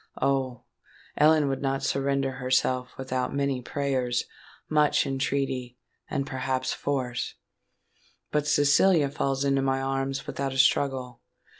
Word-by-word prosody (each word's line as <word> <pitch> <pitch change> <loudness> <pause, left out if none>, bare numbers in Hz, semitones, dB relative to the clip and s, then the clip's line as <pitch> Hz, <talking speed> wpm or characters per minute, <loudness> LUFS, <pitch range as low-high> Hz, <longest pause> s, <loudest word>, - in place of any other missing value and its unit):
Oh! 130 -3 0 0.5
Ellen 155 0 +4
would 135 -1 -2
not 135 0 -1
surrender 140 0 0
herself 130 0 +1
without 130 0 -2
many 140 -2 0
prayers—much 140 +3 -1
entreaty—and, 135 0 -3
perhaps, 130 -1 -2
force;—but 140 +2 -5
Cecilia 145 +1 +4
falls 135 0 -1
into 135 -1 +2
my 135 0 +1
arms 135 0 -2
without 135 -1 -3
a - - -5
struggle! 130 -3 +2
135 Hz, 105 wpm, -27 LUFS, 130-140 Hz, 0.5 s, Ellen